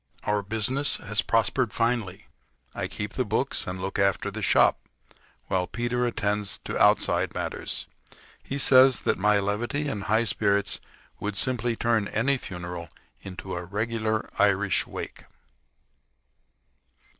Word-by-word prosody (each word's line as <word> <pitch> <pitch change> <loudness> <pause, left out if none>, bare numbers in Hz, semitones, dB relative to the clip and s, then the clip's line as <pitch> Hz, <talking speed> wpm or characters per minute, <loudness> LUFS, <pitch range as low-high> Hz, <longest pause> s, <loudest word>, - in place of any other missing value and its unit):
Our 105 0 +1
business 110 +8 0
has 105 +1 0
prospered 115 +1 +1
finely. 115 -6 -1 0.5
I - - -3
keep 105 +1 -5
the 130 - 0
books 115 +5 -1
and 90 0 -4
look 95 +2 -3
after 100 -2 +1
the - - -5
shop, - - +4 0.7
while 90 -2 0
Peter 120 +1 -1
attends 105 -3 -1
to - - -4
outside - - +3
matters. - - -3 0.6
He 140 - -4
says 130 -2 +6
that - - 0
my 105 +2 +4
levity 120 +9 -1
and 105 -8 -3
high 110 +2 +3
spirits 100 -2 +1 0.4
would 105 0 -3
simply 120 +1 0
turn 115 -3 +1
any 130 +5 +1
funeral 90 -3 -7 0.3
into 95 0 -7
a 85 - -4
regular 110 +3 -2
Irish 100 -1 +3
wake. - - -7
105 Hz, 135 wpm, -26 LUFS, 100-120 Hz, 0.7 s, says